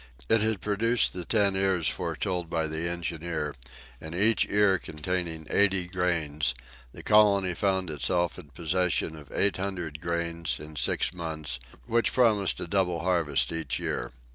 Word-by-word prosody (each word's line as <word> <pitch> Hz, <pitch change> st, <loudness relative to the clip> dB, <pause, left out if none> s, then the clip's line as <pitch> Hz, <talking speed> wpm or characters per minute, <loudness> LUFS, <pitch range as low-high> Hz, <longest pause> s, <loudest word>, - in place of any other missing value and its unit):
It 115 Hz, -, +4 dB
had 110 Hz, -2 st, 0 dB
produced 115 Hz, +4 st, +1 dB
the 90 Hz, -2 st, -6 dB
ten 100 Hz, -3 st, +2 dB
ears 95 Hz, -4 st, +2 dB
foretold 90 Hz, 0 st, -2 dB
by 80 Hz, -1 st, 0 dB
the 80 Hz, +2 st, -2 dB
engineer, 85 Hz, -3 st, -3 dB, 0.5 s
and 80 Hz, +1 st, -7 dB
each 110 Hz, +5 st, +3 dB
ear 100 Hz, -2 st, +4 dB
containing 80 Hz, +1 st, -3 dB
eighty 95 Hz, -3 st, +3 dB
grains, 80 Hz, -7 st, 0 dB, 0.4 s
the -, -, -11 dB
colony 100 Hz, -3 st, +4 dB
found 95 Hz, -2 st, 0 dB
itself 85 Hz, +5 st, 0 dB
in -, -, -10 dB
possession 85 Hz, +2 st, 0 dB
of 75 Hz, -3 st, -13 dB
eight 100 Hz, -2 st, +2 dB
hundred 90 Hz, -6 st, -4 dB
grains, 85 Hz, -1 st, -1 dB
in 75 Hz, +1 st, -10 dB
six 65 Hz, +6 st, 0 dB
months, 80 Hz, -7 st, -4 dB, 0.3 s
which 115 Hz, 0 st, +1 dB
promised 110 Hz, -6 st, +2 dB
a -, -, -3 dB
double 90 Hz, -2 st, 0 dB
harvest 85 Hz, -6 st, +1 dB
each 80 Hz, -1 st, -2 dB
year. -, -, -3 dB
90 Hz, 150 wpm, -28 LUFS, 80-95 Hz, 0.5 s, It